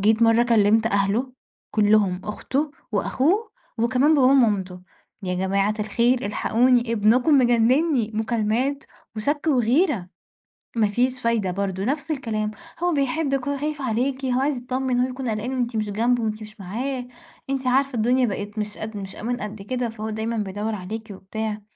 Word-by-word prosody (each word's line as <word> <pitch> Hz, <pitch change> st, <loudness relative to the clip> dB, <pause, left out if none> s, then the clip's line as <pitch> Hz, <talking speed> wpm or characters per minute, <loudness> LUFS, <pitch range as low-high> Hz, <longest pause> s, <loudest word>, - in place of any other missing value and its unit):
جيت 220 Hz, +3 st, +3 dB
مَرّة 225 Hz, +1 st, +5 dB
كلِّمت 225 Hz, -1 st, +3 dB
أهله، 210 Hz, +5 st, +1 dB, 0.4 s
كُلّهم 205 Hz, -3 st, +3 dB
أخته 275 Hz, +7 st, -2 dB, 0.2 s
وأخوه 380 Hz, -, +1 dB, 0.3 s
وكمان 255 Hz, +6 st, +3 dB
باباه 265 Hz, -3 st, +5 dB
ومامته، 200 Hz, -9 st, +2 dB, 0.4 s
"يا 180 Hz, -1 st, -2 dB
جماعة 195 Hz, +3 st, +1 dB
الخير 235 Hz, +2 st, +1 dB
إلحقوني، 235 Hz, +3 st, +2 dB
ابنكم 245 Hz, +7 st, +4 dB
مجنّني، 245 Hz, +1 st, +3 dB
مكالمات 230 Hz, +5 st, 0 dB, 0.3 s
وشَك 290 Hz, +8 st, -1 dB
وغيرة،" 250 Hz, -, +2 dB, 0.7 s
ما 220 Hz, -3 st, +3 dB
فيش 250 Hz, +5 st, 0 dB
فايدة 225 Hz, -5 st, +1 dB
برضه 195 Hz, 0 st, -2 dB
نفْس 290 Hz, +6 st, -2 dB
الكلام، 215 Hz, -7 st, -2 dB, 0.3 s
"هو 355 Hz, -1 st, +2 dB
بيحبِّك 275 Hz, -1 st, 0 dB
هو 285 Hz, -, -1 dB
خايف 295 Hz, 0 st, -3 dB
عليكِ 260 Hz, +3 st, -1 dB
هو 255 Hz, 0 st, +1 dB
عايز 280 Hz, 0 st, +1 dB
يتطمّن 250 Hz, 0 st, -1 dB
هو 250 Hz, -, +2 dB
يكون 255 Hz, -1 st, -4 dB
قلقان 220 Hz, +4 st, -2 dB
وأنتِ 240 Hz, -1 st, -1 dB
مش 215 Hz, -1 st, -1 dB
جنبه، 235 Hz, +3 st, +1 dB
وأنتِ 215 Hz, 0 st, -2 dB
مش 215 Hz, 0 st, -11 dB
معاه، 245 Hz, +7 st, -4 dB, 0.4 s
أنتِ 265 Hz, -1 st, -2 dB
عارفة 270 Hz, +1 st, +2 dB
الدنيا 245 Hz, +3 st, +3 dB
بقِت 205 Hz, 0 st, -4 dB
مش 210 Hz, 0 st, -4 dB
قد 215 Hz, -1 st, -6 dB
مش 195 Hz, -1 st, -7 dB
أمان 245 Hz, +3 st, -3 dB
قد 210 Hz, -1 st, -6 dB
كده 245 Hz, +2 st, -2 dB
فهو 220 Hz, -1 st, -5 dB
دايمًا 220 Hz, +1 st, -2 dB
بيدوّر 210 Hz, +2 st, -2 dB
عليكِ 215 Hz, +4 st, -6 dB
وبتاع،" 210 Hz, +2 st, -5 dB
230 Hz, 155 wpm, -23 LUFS, 210-260 Hz, 0.7 s, مَرّة